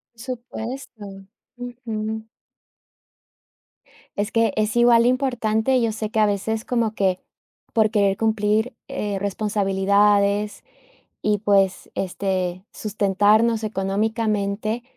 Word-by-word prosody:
Supuesto. 230 -4 -7 0.3
Ujú. 220 -3 -5 1.9
Es 205 +2 -2
que 230 -3 +2
es 215 +1 0
igual 240 -1 +6
de 240 - +4
importante. 250 -1 +1
Yo 230 -1 +1
sé 215 0 -4
que 220 - 0
a 215 - +5
veces 210 +2 -1
como 230 -3 0
que, 190 -3 +1 0.5
por 220 -2 +3
querer 200 -3 +2
cumplir, 220 +2 +1
eh, 205 -2 -3
responsabilidades 200 0 +1 0.6
y, 210 0 +2
pues, 195 -2 +2
este, 185 -1 -2
sustentarnos 210 +2 +2
económicamente, 215 +1 -1
215 Hz, 100 wpm, -22 LUFS, 200-225 Hz, 1.9 s, igual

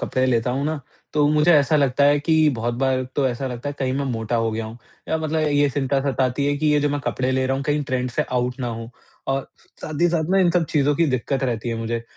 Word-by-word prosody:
कपड़े 130 -1 0
लेता 120 -1 +1
हूँ 135 +3 -1
ना, 155 0 -2 0.3
तो 150 -1 +3
मुझे 150 +3 +4
ऐसा 150 0 +4
लगता 140 -1 +2
है 145 +1 +5
कि 155 +1 +3
बहुत 120 +2 -2
बार 130 +1 0
तो 140 - +2
ऐसा 125 +2 -3
लगता 125 +2 -5
है 145 - -4
कहीं 130 -2 -1
मैं 140 +1 -1
मोटा 115 +1 -2
हो 115 -1 0
गया 110 +1 -3
हूँ 110 +2 -9 0.3
या 160 - +1
मतलब 155 0 -1
ये 145 0 +3
चिंता 135 0 0
सताती 130 +1 0
है, 145 0 +1
कि 155 - -1
ये 150 -1 +3
जो 145 - +1
मैं 145 0 -2
कपड़े 130 -1 -1
ले 130 0 +1
रहा 135 +1 0
हूँ 135 - -3
कहीं 145 +1 0
ट्रेंड 125 -1 -2
से - - 0
आउट 125 0 -1
ना 125 - -2
हों 115 0 -6 0.4
और 135 0 -2 0.4
साथ 155 -1 -5
ही 175 - +5
साथ 165 -1 -1
ना 195 - +4
इन 180 -2 +4
सब 175 -1 +2
चीज़ों 145 -1 +2
की 165 +3 +2
दिक्कत 135 +1 -1
रहती 120 -2 -2
है 115 - -1
मुझे, 115 +1 -3
135 Hz, 270 wpm, -22 LUFS, 125-150 Hz, 0.4 s, है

